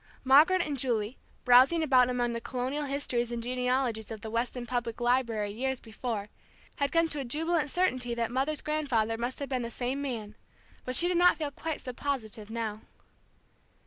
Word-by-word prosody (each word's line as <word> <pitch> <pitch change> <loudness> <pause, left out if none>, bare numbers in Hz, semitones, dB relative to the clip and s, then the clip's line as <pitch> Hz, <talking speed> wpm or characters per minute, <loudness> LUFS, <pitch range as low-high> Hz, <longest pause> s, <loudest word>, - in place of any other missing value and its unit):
Margaret 310 +8 +6
and 290 -4 -4
Julie, 235 -2 -1 0.3
browsing 260 +7 +6
about 255 -4 +5
among 245 -1 0
the 235 - -4
colonial 260 +5 -3
histories 255 -4 -2
and 235 -1 -3
genealogies 250 -2 -1
of 220 -2 -7
the 220 - -6
Weston 240 +1 -2
Public 240 -2 -3
Library 235 -4 +1
years 260 +4 -2
before, 220 -2 -5 0.5
had 280 -1 0
come 330 0 +3
to 300 - -2
a - - -2
jubilant 310 +5 0
certainty 255 -9 0
that 235 -1 -1
mother's 275 +4 0
grandfather 265 -8 0
must 240 +3 -3
have 280 - -4
been 255 -2 -1
the 235 - -4
same 250 +4 -3
man. 225 -7 -4 0.5
But 255 - -1
she 345 - +4
did 355 -1 +1
not 355 -1 +5
feel 295 -2 -3
quite 320 +2 -4
so 250 - -6
positive 235 -6 -4
now. 220 -2 -4
250 Hz, 180 wpm, -29 LUFS, 235-280 Hz, 0.5 s, Margaret